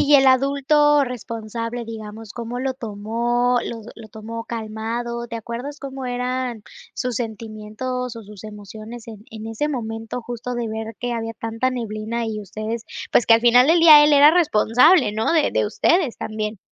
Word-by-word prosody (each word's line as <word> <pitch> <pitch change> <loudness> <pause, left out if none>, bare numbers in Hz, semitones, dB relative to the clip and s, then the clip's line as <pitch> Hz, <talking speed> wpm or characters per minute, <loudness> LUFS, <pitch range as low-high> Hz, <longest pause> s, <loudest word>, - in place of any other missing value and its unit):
y 290 +1 +4
el 270 -1 +6
adulto 280 +2 +4
responsable, 230 -1 -5
digamos, 220 -1 -8
¿cómo 240 +1 -5
lo 265 0 -1
tomó, 235 +2 -1
lo 230 -1 -6
lo 225 -2 -12
tomó 225 +2 -7
calmado? 235 +1 -4
¿Te 230 - -5
acuerdas 240 +6 -6
cómo 270 -2 -6
eran 250 -2 -3 0.3
sus 250 -3 -2
sentimientos 230 +2 -5
o 230 - -8
sus 210 -1 -12
emociones 215 +2 -10
en 215 -2 -11
en 220 0 -8
ese 225 +7 -2
momento?, 225 -2 -4
justo 245 +1 -5
de 240 -1 -2
ver 220 0 -5
que 245 -1 -3
había 225 -1 -4
tanta 225 +3 -2
neblina, 230 -1 -3
y 215 -1 -4
ustedes, 215 +3 -5 0.3
pues, 240 - +4
que 225 - +7
al 225 - +3
final 245 +2 +6
del 330 +1 +4
día, 310 -3 +9
él 295 - +4
era 290 +1 +8
responsable, 285 - +4
¿no?, 220 +1 0
de 315 -3 +3
de 110 -1 +1
ustedes 330 - +1
también. 215 -1 -4
235 Hz, 170 wpm, -22 LUFS, 220-255 Hz, 0.3 s, día